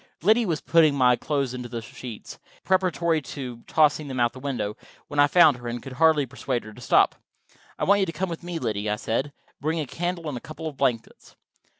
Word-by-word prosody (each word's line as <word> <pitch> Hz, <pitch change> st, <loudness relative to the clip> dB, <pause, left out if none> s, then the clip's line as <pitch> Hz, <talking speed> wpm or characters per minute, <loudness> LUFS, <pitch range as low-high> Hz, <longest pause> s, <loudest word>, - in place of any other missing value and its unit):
Liddy 220 Hz, +4 st, +4 dB
was 160 Hz, -4 st, -1 dB
putting 160 Hz, -4 st, +4 dB
my 125 Hz, -2 st, +5 dB
clothes 140 Hz, -2 st, -2 dB
into 120 Hz, -2 st, -5 dB
sheets, 115 Hz, 0 st, -9 dB, 0.2 s
preparatory 175 Hz, -4 st, +1 dB
to 125 Hz, -3 st, -7 dB
tossing 155 Hz, -1 st, +3 dB
them 130 Hz, -2 st, -4 dB
out 120 Hz, -1 st, +2 dB
the 130 Hz, -, -10 dB
window, 120 Hz, -7 st, -3 dB, 0.3 s
when 145 Hz, -, -3 dB
I 145 Hz, -, +7 dB
found 155 Hz, -4 st, +6 dB
her, 120 Hz, -1 st, -8 dB
and 120 Hz, +1 st, -3 dB
I -, -, -8 dB
could 135 Hz, -, -9 dB
hardly 155 Hz, 0 st, +4 dB
persuade 125 Hz, 0 st, -3 dB
her 110 Hz, -, -11 dB
to -, -, -13 dB
stop. -, -, +4 dB, 0.6 s
"I -, -, -3 dB
want 200 Hz, +1 st, +4 dB
you 195 Hz, -, +1 dB
to -, -, -2 dB
come 180 Hz, +4 st, -2 dB
with 170 Hz, -2 st, -6 dB
me, 175 Hz, -1 st, -5 dB
Liddy," 110 Hz, -6 st, -2 dB
I 105 Hz, -, +1 dB
said. 120 Hz, +6 st, -2 dB, 0.3 s
"Bring 160 Hz, +3 st, -1 dB
a 155 Hz, -, -2 dB
candle 170 Hz, +4 st, -3 dB
and 145 Hz, -, -3 dB
a 120 Hz, -, -6 dB
couple 160 Hz, +2 st, -9 dB
of 150 Hz, -, -6 dB
blankets." 115 Hz, -3 st, -2 dB
140 Hz, 225 wpm, -25 LUFS, 120-165 Hz, 0.6 s, I